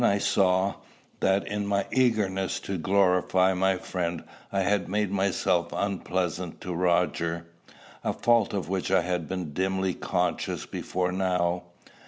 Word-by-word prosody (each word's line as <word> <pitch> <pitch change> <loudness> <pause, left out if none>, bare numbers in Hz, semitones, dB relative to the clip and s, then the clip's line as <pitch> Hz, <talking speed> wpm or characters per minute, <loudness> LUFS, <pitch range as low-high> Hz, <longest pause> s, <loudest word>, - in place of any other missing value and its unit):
Then - - +5
I 100 - +2
saw, 95 -1 +2 0.5
that, 95 +1 +2
in 105 0 -2
my 100 -1 +1
eagerness 105 -7 +1
to 95 -2 -4
glorify 95 0 +3
my 95 +1 +2
friend, 85 -2 -3 0.3
I 100 - +1
had 95 -2 +1
made 105 0 0
myself 90 -3 +1
unpleasant 90 -3 -2
to 90 - -4
Roger, 85 -1 +1 0.6
a - - +1
fault 120 -3 +2
of 100 -3 -2
which 95 0 -2
I 95 -1 +4
had 90 -3 -2
been 90 -5 -4
dimly 95 +1 0
conscious 90 0 -1
before 90 -1 -2
now. 90 -1 0
95 Hz, 145 wpm, -27 LUFS, 90-100 Hz, 0.6 s, Then